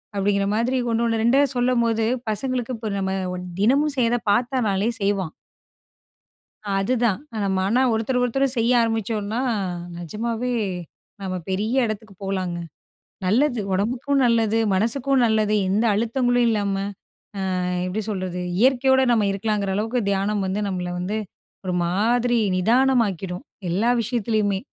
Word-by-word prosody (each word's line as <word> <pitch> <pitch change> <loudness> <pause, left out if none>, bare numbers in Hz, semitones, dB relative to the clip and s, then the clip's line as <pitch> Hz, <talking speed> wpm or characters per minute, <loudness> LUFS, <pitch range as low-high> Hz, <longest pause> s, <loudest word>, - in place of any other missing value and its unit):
அப்டிங்கிற 200 0 +1
மாதிரி 245 +4 +1
ஒண்ணோனு 230 -1 +1
2அ 260 +4 +4
சொல்லும்போது 235 -3 +2 0.2
பசங்களுக்கு 250 +3 -2
இப்ப 220 -1 -4
நம்ம 190 0 -1 0.5
தினமும் 280 +6 +3
செய்ற 235 0 +3 0.2
பார்த்தானாலே 225 -3 +1
செய்வான். 195 -4 0 1.5
அதுதான் 230 +1 +1 0.4
மன 225 +7 +2
ஒருத்தர், 225 +3 0
ஒருத்தர் 270 +2 +1
செய்ய 235 +2 +3
ஆரம்பிச்சோம்னா 225 0 -1 0.6
நிஜமாவே 230 +7 -3 0.7
நம்ம 185 -1 -3
பெரிய 220 +7 +1
இடத்துக்கு 215 -1 -6
போலாங்க. 185 -3 -2 0.7
நல்லது 240 +5 +2
உடம்புக்கும், 250 +8 0
நல்லது 225 -2 +2 0.2
மனசுக்கும் 255 +6 +2
நல்லது 215 -1 +2
எந்த 210 +5 +1
அழுத்தங்களும் 245 +2 +1
இல்லாம, 205 -3 0 0.9
ஆ - - -1 0.2
எப்டி 205 +4 -2
சொல்றது, 185 -3 -3 0.2
இயற்கையோட 265 +1 +4
நம்ம 220 -3 +3
இருக்கலாங்குற 200 -1 -1
அளவுக்கு 225 +4 0
தியானம் 200 +1 0
வந்து 195 +3 -1
நம்மள 180 -2 -3
வந்து 195 +4 -2 0.5
ஒரு 180 - -1
மாதிரி 235 +7 +2 0.2
நிதானமாக்கிடும், 215 -5 +1 0.3
எல்லா 205 +7 +1
விஷயத்துலயுமே. 215 -4 0
220 Hz, 115 wpm, -23 LUFS, 200-245 Hz, 1.5 s, 2அ